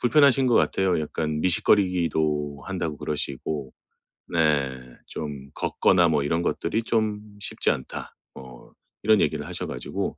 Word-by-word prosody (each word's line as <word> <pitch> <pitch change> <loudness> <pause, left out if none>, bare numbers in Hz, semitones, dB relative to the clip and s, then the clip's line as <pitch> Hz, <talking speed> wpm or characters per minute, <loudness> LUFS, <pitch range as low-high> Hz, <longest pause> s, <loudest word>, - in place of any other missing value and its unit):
불편하신 135 +1 +5
것 120 - +3
같아요. 95 -3 +2
약간 75 0 -2
미식거리기도 80 -6 +2
한다고 85 -6 -3
그러시고. 70 -1 -4 0.6
네 70 -7 0
좀 70 -3 -7
"걷거나 90 -3 +3
뭐 75 -3 +2
이런 85 +3 0
것들이 110 - -1
좀 110 -3 0 0.2
쉽지 - - -1
않다." 65 - -5 0.2
뭐 65 -2 -13 0.3
이런 110 -1 +5
얘기를 - - 0
하셔 - - -5
가지고. - - -4
80 Hz, 295 characters per minute, -25 LUFS, 70-95 Hz, 0.6 s, 불편하신